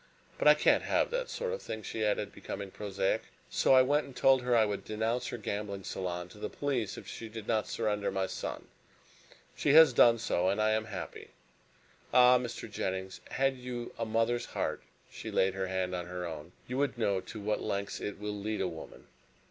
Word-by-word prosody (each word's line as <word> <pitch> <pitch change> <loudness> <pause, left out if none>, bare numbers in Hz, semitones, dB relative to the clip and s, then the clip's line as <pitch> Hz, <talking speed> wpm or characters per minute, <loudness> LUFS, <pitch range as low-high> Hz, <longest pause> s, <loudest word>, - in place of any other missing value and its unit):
But - - +3
I - - +9
can't - - +4
have - - +1
that - - -2
sort 480 -1 -3
of 485 - -4
thing," 110 -1 -6
she 110 - -3
added, 105 -1 0
becoming 100 -1 -6
prosaic, 100 -1 -1 0.3
"so 135 - +4
I 130 - +8
went 145 +3 +2
and 135 - -12
told 135 -1 +5
her 125 -1 +2
I 110 - +5
would 105 -1 -3
denounce 110 +3 -1
her - - -4
gambling 100 -2 -4
salon 90 -2 -4
to 105 - -14
the - - -3
police 125 -8 -2
if - - -10
she 115 - -7
did 110 -1 -8
not 110 -2 +1
surrender 105 -3 -1
my 95 0 0
son. - - -5 0.9
She 145 - +2
has 160 -3 +9
done 115 0 +6
so, 95 -5 +1
and 100 - 0
I 110 0 +3
am 110 0 +1
happy. 90 -7 -7 0.8
Ah, 125 0 +7
Mr. 120 -2 -5
Jennings, 95 -3 -4
had 135 0 +1
you 125 -1 -6
a 115 - -3
mother's 115 +2 +1
heart," - - -2 0.3
she - - -7
laid 95 0 +2
her 95 -1 -2
hand 95 0 -1
on 90 -1 -3
her 90 0 -4
own, 80 0 -7
"you 125 +2 -2
would 140 -3 0
know 100 -5 +1
to 110 - -9
what 105 +1 -1
lengths 100 0 -3
it 105 - -4
will 105 0 -4
lead 105 +1 -3
a 95 - +1
woman!" 80 -2 -9
110 Hz, 210 wpm, -31 LUFS, 95-120 Hz, 0.9 s, I